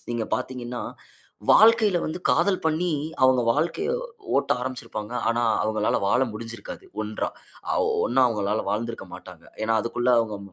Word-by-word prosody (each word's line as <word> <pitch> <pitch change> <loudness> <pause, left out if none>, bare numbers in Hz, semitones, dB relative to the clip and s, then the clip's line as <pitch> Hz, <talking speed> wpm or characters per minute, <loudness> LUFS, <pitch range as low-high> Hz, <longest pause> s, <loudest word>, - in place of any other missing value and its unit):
நீங்க 115 -2 -2
பார்த்தீங்கன்னா, 125 -1 -5 0.7
வாழ்க்கையில 220 -4 +6
வந்து 155 - -3
காதல் 200 -2 +3
பண்ணி, 160 +3 +1 0.3
அவுங்க 130 -1 +5
வாழ்க்கைய 170 - -1 0.5
ஓட்ட - - +2
ஆரம்பிச்சுருப்பாங்க. 125 -3 -5 0.2
ஆனா, 120 +1 +1 0.2
அவுங்களால 110 0 +1
வாழ 125 - +3
முடுஞ்சுருக்காது 115 +1 -8 0.2
ஒன்றா! 105 0 -3 0.4
ஆ - - +1 0.3
ஒன்னா 130 +2 +3
அவுங்களால 105 -2 -1
வாழ்ந்திருக்க 115 +2 -3
மாட்டாங்க. - - -13 0.2
ஏனா, 115 +1 +2
அதுக்குள்ள 120 +2 0
அவுங்க 110 -3 -2
120 Hz, 130 wpm, -25 LUFS, 110-145 Hz, 0.7 s, வாழ்க்கையில